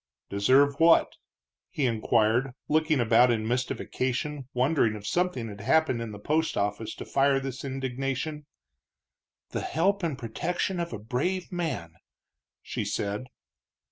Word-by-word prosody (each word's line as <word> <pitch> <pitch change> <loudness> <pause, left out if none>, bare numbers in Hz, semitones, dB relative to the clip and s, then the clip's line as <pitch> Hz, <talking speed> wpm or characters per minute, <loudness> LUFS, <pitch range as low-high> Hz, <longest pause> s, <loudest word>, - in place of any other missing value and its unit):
"Deserve 135 +8 +3
what?" 165 0 +5 0.5
he 145 - -1
inquired, 115 +2 +2
looking 155 -1 +2
about 120 +1 +5
in 110 -2 0
mystification, 130 +2 -2
wondering 125 -3 +2
if 105 -1 -9
something 175 -6 0
had 100 -2 -8
happened 130 0 +2
in 115 -2 -5
the 105 - -7
post 155 +9 0
office 105 +2 -2
to - - -7
fire 140 0 +3
this 135 -1 -6
indignation. 135 +3 -3 1.0
"The - - -2
help 195 +6 +1
and 160 -6 -2
protection 175 - -2
of 170 0 -3
a 110 - -4
brave 140 - -2
man!" 150 - -3 0.7
she - - -3
said. 105 +4 -2
130 Hz, 135 wpm, -27 LUFS, 115-155 Hz, 1.0 s, what